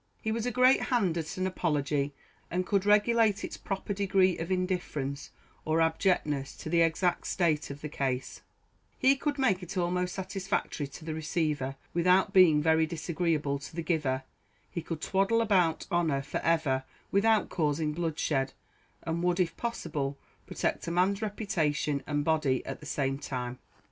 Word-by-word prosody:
He 220 - -2
was 230 +1 -1
a - - 0
great 255 +2 +5
hand 205 -10 +1
at 160 +2 -5
an 185 - 0
apology, 145 -6 0 0.4
and 180 +2 -1
could 200 0 +1
regulate 210 0 +4
its - - -5
proper 195 +1 -4
degree 190 -2 +3
of 165 +3 -4
indifference 175 -7 -2 0.3
or 155 +1 +1
abjectness 160 -4 +1
to 155 - -6
the 170 -1 +4
exact 165 +2 +1
state 165 -5 +1
of 140 +1 -8
the 150 - -4
case; 135 -3 -3 0.6
he 270 +1 +5
could 290 +1 -2
make 225 -9 +2
it 180 +2 -7
almost 180 0 0
satisfactory 190 -6 -2
to 150 +3 -11
the 160 - -3
receiver, 150 -4 -1 0.2
without 180 +2 +3
being 160 -6 +6
very 160 0 +3
disagreeable 160 -3 -1
to 145 - -10
the 170 - -3
giver; 145 -6 0 0.5
he 170 - -3
could 160 -1 -5
twaddle 195 +6 +2
about 185 -8 +2
honour 160 -6 +1
for 145 - -3
ever 155 -6 +1 0.3
without 215 +2 +3
causing 150 -2 0
bloodshed; 150 -4 -1 0.5
and 165 +1 -2
would, 180 +1 +1
if 175 -2 +1
possible, 150 -12 -3 0.3
protect - - -2
a - - 0
man's 185 +4 +1
reputation 160 -9 -1
and 145 -1 -1
body 155 -5 +1
at - - -5
the 150 - -10
same 135 -1 -1
time. 125 -2 -4
165 Hz, 165 wpm, -29 LUFS, 150-190 Hz, 0.6 s, being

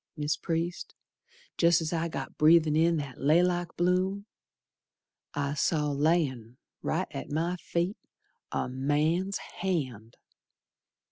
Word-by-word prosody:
Mis' 150 +1 0
Priest, 170 +2 -3 0.6
jest's 170 -1 +3
I 165 0 0
got 165 - -6
breathin' 155 0 +5
in 165 +1 +3
that 140 -3 -6
laylock 175 +4 +2
bloom 185 +3 +1 1.1
I 145 0 -1
saw, 150 0 +1
layin' 140 -6 0 0.2
right - - -1
at - - -6
my 165 +4 0
feet, 175 +3 -2 0.5
A - - -1
man's 150 +9 0
hand! 130 - -4
160 Hz, 110 wpm, -29 LUFS, 145-175 Hz, 1.1 s, breathin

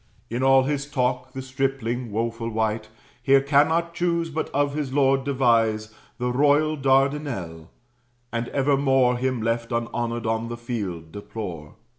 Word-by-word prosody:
In 120 +2 -2
all 135 0 +5
his 140 +1 -2
talk, 130 -1 -1
the 130 - -5
stripling, 130 -3 -2
woeful 115 +2 -2
wight, 110 -1 -1 0.3
Here 135 0 +5
cannot 155 +5 +2
choose, 170 -1 0
but 160 +1 -2
of 145 0 0
his 145 -3 -3
lord 135 -1 +3
devise, 115 -5 +1 0.2
The 125 0 -1
royal 145 +4 +3
Dardinel; 135 - 0 0.6
and 115 +1 -2
evermore 135 -2 +2
Him 130 -3 -1
left 115 +1 -1
unhonored 115 0 -2
on 110 +1 -1
the 120 0 -5
field, 100 -9 -5
deplore. 90 -7 -7
125 Hz, 140 wpm, -24 LUFS, 115-140 Hz, 0.6 s, all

